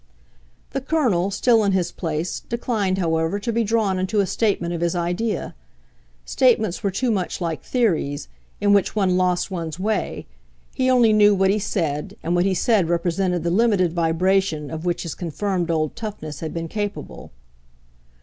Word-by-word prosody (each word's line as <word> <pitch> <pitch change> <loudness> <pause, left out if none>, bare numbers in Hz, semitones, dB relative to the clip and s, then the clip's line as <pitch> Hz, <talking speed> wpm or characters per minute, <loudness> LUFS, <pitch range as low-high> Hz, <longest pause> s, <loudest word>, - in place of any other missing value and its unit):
The 270 - -2
Colonel, 250 - +1
still 225 +2 +3
in 200 -1 +2
his 185 -2 0
place, 165 0 -3
declined, 220 -5 -1
however, 165 0 0
to 230 +3 -3
be 230 +1 +2
drawn 210 -3 +1
into 190 +3 0
a 200 - +3
statement 185 -3 0
of 170 - -4
his 170 +1 0
idea. 175 +6 -2 0.7
Statements 220 - +2
were 200 - 0
too 235 +6 0
much 190 -4 -2
like 165 -3 -3
theories, 170 - 0 0.3
in 205 0 +3
which 200 0 +2
one 190 -4 +2
lost 180 0 +1
one's 165 -3 -4
way; 210 +2 -2 0.5
he 260 0 +1
only 240 -4 +5
knew 210 -1 +5
what 190 0 +3
he 210 - +1
said, 160 -8 -2
and 170 - -1
what 175 +1 +2
he 195 -1 +1
said 195 -3 +2
represented 175 0 0
the 170 - 0
limited 195 -4 +2
vibration 170 -2 +1
of 160 +1 -5
which 175 -1 -1
his 170 - -4
confirmed 180 +1 -2
old 155 -2 0
toughness 155 -10 -6
had 160 - -4
been 165 -1 -4
capable. 205 +3 -5
185 Hz, 170 wpm, -22 LUFS, 170-210 Hz, 0.7 s, only